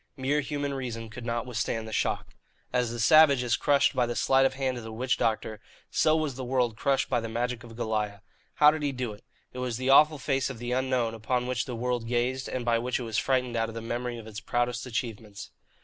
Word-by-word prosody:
Mere 140 +3 +1
human 145 0 -3
reason 115 -4 -5
could 120 +1 -8
not 115 0 -1
withstand 115 -2 -2
the 110 - -7
shock. - - -1 0.4
As 125 -2 +1
the 120 0 -5
savage 140 +1 +6
is 120 -1 +2
crushed 140 -1 +3
by 125 -1 +2
the 120 - -3
sleight 135 +2 +4
of 135 - -7
hand 130 -2 -1
of - - -9
the 110 - -7
witch 125 +3 0
doctor, 110 -1 -1 0.3
so 155 0 +3
was 155 -3 0
the 130 +1 -6
world 125 -3 0
crushed 135 +4 +1
by 120 - +1
the 115 0 -5
magic 120 +1 -2
of 115 -1 -11
Goliah. 105 -3 -2 0.3
How 150 0 +7
did 155 0 -4
he 145 -1 0
do 125 -4 -4
it? 105 - -15 0.3
It 125 - -6
was 125 -3 -2
the 130 +1 +1
awful 150 +2 +6
face 135 -1 0
of 135 - -6
the 120 +1 -5
Unknown 125 -3 0
upon 120 +3 -1
which 125 -1 -1
the 125 - -5
world 120 0 -2
gazed 125 +2 -1
and 125 -2 -3
by 115 -1 +2
which 125 +1 -1
it - - -4
was 115 -2 -1
frightened 125 -2 0
out 115 -1 0
of 115 - -9
the - - -3
memory 120 +1 -3
of 115 - -9
its 110 -1 -7
proudest 120 +3 -1
achievements. 115 -4 -5
125 Hz, 240 wpm, -28 LUFS, 115-130 Hz, 0.4 s, How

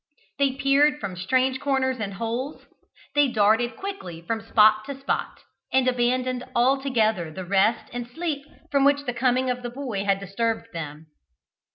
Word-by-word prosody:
They 275 -2 +3
peered 280 +2 +3
from 195 -6 -5
strange 260 +8 +1
corners 260 -2 0
and 200 -2 -4
holes, 235 +7 -4 0.5
they 290 0 +4
darted 225 +1 +2
quickly 385 - -6
from 220 +7 -3
spot 215 -1 +4
to 275 +1 -7
spot, 275 - -3 0.3
and 260 -1 +3
abandoned 250 0 +1
altogether 235 - +2
the 185 +3 -7
rest 200 +4 +2
and 245 -1 -4
sleep 295 +2 -3 0.3
from 280 -1 +3
which 285 0 +3
the 245 - -2
coming 255 +1 +1
of 250 0 -4
the 240 - -4
boy 240 -6 -4
had 195 -1 +1
disturbed 225 +4 -2
them. 155 -1 -6
245 Hz, 160 wpm, -25 LUFS, 215-270 Hz, 0.5 s, they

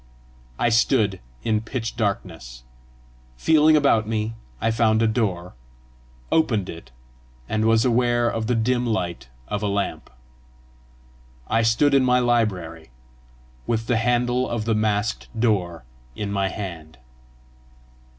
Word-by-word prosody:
I 120 - +2
stood 115 -4 +2 0.2
in 110 -2 +1
pitch 115 0 -5
darkness. 80 - -4 0.7
Feeling 155 - +4
about 115 -7 +3
me, 110 0 -2 0.3
I 115 - +1
found 110 0 +2
a - - +4
door, 95 -6 -1 0.8
opened 115 - +1
it, 85 - -9 0.6
and 110 0 0
was 115 +1 +3
aware 120 -1 +2
of 115 -1 -2
the 125 - +1
dim 120 +2 +1
light 90 - -3 0.2
of 105 0 -3
a 105 - -1
lamp. 100 0 -3 1.4
I 115 +1 +2
stood 115 +6 +3
in 135 -1 +5
my 125 0 +3
library, 95 - -1 0.8
with 115 -1 -1
the 120 0 +1
handle 125 +2 +1
of 115 -2 -3
the 115 - +1
masked 105 0 -1
door 95 - 0 0.3
in 105 -1 -4
my 100 -1 0
hand. 85 -6 -7
110 Hz, 130 wpm, -23 LUFS, 100-120 Hz, 1.4 s, in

